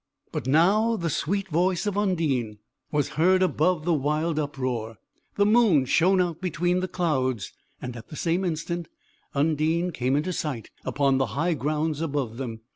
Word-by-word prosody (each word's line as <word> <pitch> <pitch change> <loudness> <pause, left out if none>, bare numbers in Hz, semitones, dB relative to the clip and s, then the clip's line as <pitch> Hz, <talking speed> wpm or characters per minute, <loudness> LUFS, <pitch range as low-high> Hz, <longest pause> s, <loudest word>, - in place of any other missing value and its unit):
But - - -4
now 200 +11 +4
the 170 -6 -2
sweet 195 +7 -1
voice 175 +4 +1
of 205 -2 -1
Undine 155 - 0 0.3
was 145 -2 0
heard 180 +6 +3
above 175 -2 +1
the 175 - +2
wild 155 +2 0
uproar; 130 -6 -3 0.4
the 205 - +3
moon 210 - +4
shone 185 +8 +3
out 175 -2 -1
between 180 0 0
the 185 - -2
clouds, 130 - -1 0.3
and 125 -1 -6
at 115 - -10
the - - -9
same 170 +4 0
instant 170 0 -3 0.5
Undine 160 +4 +1
came 130 -3 0
into 165 +6 0
sight, 140 -9 -4
upon 135 -1 +2
the 135 - +1
high 170 +3 +2
grounds 150 +2 -1
above 140 -7 -2
them. 115 -4 -5
155 Hz, 165 wpm, -26 LUFS, 135-180 Hz, 0.5 s, now